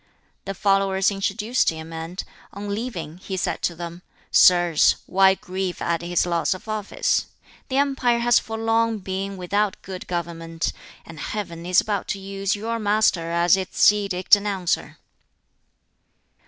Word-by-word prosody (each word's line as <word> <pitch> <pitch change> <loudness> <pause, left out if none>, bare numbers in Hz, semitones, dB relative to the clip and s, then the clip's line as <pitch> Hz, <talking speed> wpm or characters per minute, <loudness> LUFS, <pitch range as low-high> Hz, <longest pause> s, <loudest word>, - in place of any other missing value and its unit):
The 195 0 -4
followers 195 0 +2
introduced 210 +5 0
him; 160 0 -7
and, 165 +3 -5 0.3
on 200 +1 -5
leaving, 185 -8 -5
he 190 0 -5
said - - -2
to 170 - -1
them, 170 +1 -7 0.3
"Sirs, 175 -3 +5
why 190 0 +4
grieve 185 -1 -4
at 170 -1 -1
his 175 +1 0
loss 170 +1 0
of 185 - -13
office? 215 -2 -1 0.4
The 265 - 0
empire 270 -4 +2
has 240 0 +4
for 225 0 -6
long 225 0 +1
been 195 0 -4
without 200 +2 -1
good 185 -1 -8
government; 165 -1 -3 0.3
and 165 -2 -11
Heaven 175 -4 -5
is 180 +1 +5
about 205 -2 -1
to 195 - -3
use 195 +1 -2
your 230 +3 -3
master 205 -5 +2
as 170 +1 +4
its 190 +1 +4
edict 200 -2 +3
announcer." 200 -4 -2
195 Hz, 145 wpm, -23 LUFS, 175-210 Hz, 0.4 s, Sirs